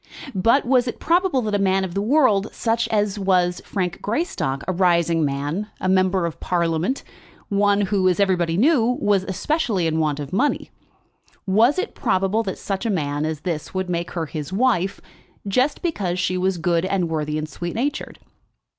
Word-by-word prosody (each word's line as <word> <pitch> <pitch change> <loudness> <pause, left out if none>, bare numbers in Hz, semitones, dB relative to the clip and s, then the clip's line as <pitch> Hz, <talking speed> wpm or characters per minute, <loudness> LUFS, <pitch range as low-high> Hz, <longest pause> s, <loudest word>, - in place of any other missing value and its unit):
But 230 +9 +3
was 250 0 +3
it 240 - -4
probable 340 -6 +2
that 210 -1 -2
a 205 - +2
man 195 0 +2
of 185 -2 -4
the 200 - -1
world, 220 -4 +3
such 230 0 0
as 210 -1 0
was 180 -2 +1
Frank 185 -2 -3
Greystock, 205 - -2
a 185 - 0
rising 170 -2 +2
man, 145 +8 -2
a - - -2
member 185 -1 +2
of 170 - -5
Parliament, 170 +7 -1 0.5
one 205 0 +2
who, 195 -2 +2
as 180 - 0
everybody 175 -4 +2
knew, 250 - +3
was 205 -7 +2
especially 200 - -1
in 160 0 0
want 150 -2 0
of 145 +3 -6
money, 280 +9 0 0.7
was 220 - +3
it 385 +5 -2
probable 195 +4 +1
that 195 -4 -4
such 195 -1 -3
a 230 - -1
man 145 -6 -1
as 155 -1 -3
this 165 +1 -4
would 185 -1 -2
make 170 0 -2
her 165 -2 -2
his 150 0 -6
wife 195 -3 +1 0.5
just 255 - +1
because 200 - -1
she 185 0 0
was 185 0 0
good, 170 0 +1
and 190 -2 0
worthy, 155 -2 -2
and 155 0 -3
sweet 175 +2 -6
natured? 275 +5 -3
190 Hz, 180 wpm, -22 LUFS, 170-220 Hz, 0.7 s, But